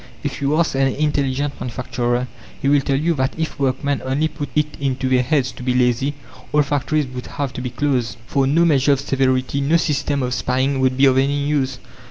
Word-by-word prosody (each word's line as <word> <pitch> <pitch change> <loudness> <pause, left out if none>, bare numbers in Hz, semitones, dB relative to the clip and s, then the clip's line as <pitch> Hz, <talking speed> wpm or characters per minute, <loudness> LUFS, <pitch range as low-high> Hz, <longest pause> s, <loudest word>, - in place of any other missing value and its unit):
If - - -4
you 140 +2 +1
ask 170 0 +1
an 135 0 +2
intelligent 140 0 -1
manufacturer, 125 0 -2 0.3
he 135 - -1
will 145 0 +4
tell 135 0 0
you 165 +4 +1
that 130 -3 -1
if 160 -2 -3
workmen 140 +1 0
only 135 +4 0
put 150 -1 -6
it 150 0 +3
into 135 -1 -1
their 130 -1 +3
heads 130 0 +1
to - - -12
be 125 0 0
lazy, 125 +3 +1 0.4
all 150 0 +4
factories 145 +1 0
would 125 -1 -7
have 140 -3 -4
to - - -5
be 125 - -3
closed, 125 -4 -1
for 135 +1 +1
no 165 +5 +3
measure 145 -3 +4
of 135 - -1
severity, 135 0 0
no 150 +5 +3
system 145 -3 0
of 125 0 -1
spying 130 +2 0
would 130 -1 +1
be 135 - +5
of 130 -1 +4
any 140 +1 +1
use. 135 -3 0
135 Hz, 215 wpm, -20 LUFS, 130-145 Hz, 0.4 s, be